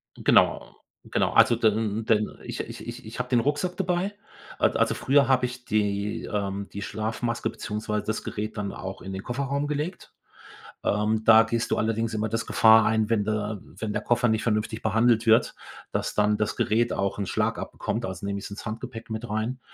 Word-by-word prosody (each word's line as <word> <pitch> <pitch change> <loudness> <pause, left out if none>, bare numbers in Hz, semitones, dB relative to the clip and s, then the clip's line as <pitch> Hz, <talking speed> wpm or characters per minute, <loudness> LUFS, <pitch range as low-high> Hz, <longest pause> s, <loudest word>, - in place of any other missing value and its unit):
Genau, - - +3 0.3
genau. - - 0
Also 120 - +6
dann 110 -1 +1
dann 110 -1 +1
ich - - -6
ich - - -8
ich 120 0 -7
ich 110 +3 -8
habe 125 - -3
den 125 -2 +3
Rucksack 145 +8 -1
dabei. 190 +1 -1 0.4
A - - +5
also - - +1
früher 140 0 +3
habe 130 -1 +3
ich 125 0 -7
die 105 -1 -1
ähm, 100 -1 -3
die 100 - -5
Schlafmaske 115 +2 -2
beziehungsweise 105 -1 -3
das 110 - -2
Gerät 110 +1 -5
dann 100 -1 -2
auch 95 +1 -7
in 95 - -6
den 95 +1 -5
Kofferraum 140 +3 -2
gelegt. 150 +5 -4 0.7
Ähm, 105 +1 +1
da 115 0 +8
gehst 115 0 -2
du - - +1
allerdings 115 +1 0
immer 110 +1 -1
das 115 +1 -2
Gefahr 110 0 +6
ein, 110 -1 +2
wenn 105 -3 +2
der 105 -1 -2
wenn 105 +2 -6
der - - -2
Koffer 120 +1 +2
nicht 110 0 +1
vernünftig 110 0 -1
behandelt 115 +1 +3
wird, 110 +1 +4 0.4
dass - - -2
dann 105 0 +3
das 105 -1 -1
Gerät 115 +2 +1
auch 100 +1 -1
'n 100 - -2
Schlag - - 0
abbekommt, 115 +2 -4
also 95 0 -5
nehme 100 0 -2
ich's 100 - -8
ins 100 - -8
Handgepäck 115 +1 -6
mit 110 +2 -4
rein. 110 +4 -2
110 Hz, 195 wpm, -26 LUFS, 105-120 Hz, 0.7 s, da